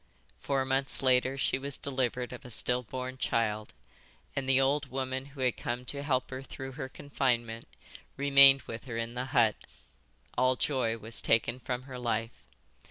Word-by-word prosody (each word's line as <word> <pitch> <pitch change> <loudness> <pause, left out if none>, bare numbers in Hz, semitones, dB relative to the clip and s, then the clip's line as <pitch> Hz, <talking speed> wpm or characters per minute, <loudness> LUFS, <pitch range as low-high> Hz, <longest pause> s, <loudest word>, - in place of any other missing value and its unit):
Four 135 -2 0
months 135 +1 -1
later 130 +1 +3
she 135 - +1
was 140 0 -3
delivered 125 -2 -2
of 125 - -9
a 125 - -10
still 125 +2 +2
born 130 +2 -6
child, 110 -3 0 0.6
and 135 -1 -2
the 135 0 +5
old 140 +1 +1
woman 130 0 -3
who 140 -1 -10
had 125 -2 +2
come 125 +1 -4
to 140 +2 -3
help 130 -3 0
her 130 0 -5
through 135 0 -8
her 130 0 -6
confinement 120 -5 -1 0.5
remained 140 -1 +7
with 115 +2 -7
her 120 -3 -5
in 115 0 -3
the 125 +1 -3
hut. 120 -6 +3 0.8
All 130 0 +3
joy 125 -5 0
was 110 +1 -3
taken 115 +2 +2
from 125 0 -4
her 130 -1 -8
life. 115 -1 -3
130 Hz, 170 wpm, -30 LUFS, 120-135 Hz, 0.8 s, remained